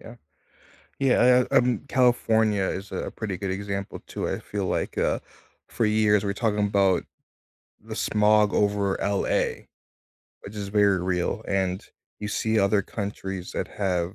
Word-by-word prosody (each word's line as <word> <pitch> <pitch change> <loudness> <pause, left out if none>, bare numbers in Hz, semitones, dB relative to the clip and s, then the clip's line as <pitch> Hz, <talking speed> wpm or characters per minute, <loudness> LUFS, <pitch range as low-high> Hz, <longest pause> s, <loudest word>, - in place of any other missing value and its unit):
Yeah. 115 - -11 0.9
Yeah, 125 -1 +5
uh - - -2
uh - - +8
um, 125 0 +2
California 110 -5 +2
is 95 +1 -4
a - - -3
pretty 105 -4 -4
good 95 0 -4
example, 100 0 -4
too, - - -4
I - - -2
feel 100 -2 -4
like, - - -2
uh, - - +1 0.5
for 115 - -1
years, 105 -1 +3
we're 100 - 0
talking 105 -1 0
'bout 95 -2 +2 0.8
the - - -7
smog 105 0 +3
over 100 -1 +1
LA. 100 0 0 0.8
Which 100 - -10
is 100 -1 -4
very 100 -3 +3
real, 90 +3 -1
and 95 -1 -1 0.4
you 105 - -4
see 110 +1 0
other 100 0 +3
countries 95 -2 -5
that - - -2
have, 90 -2 -2
100 Hz, 155 wpm, -25 LUFS, 95-110 Hz, 0.9 s, uh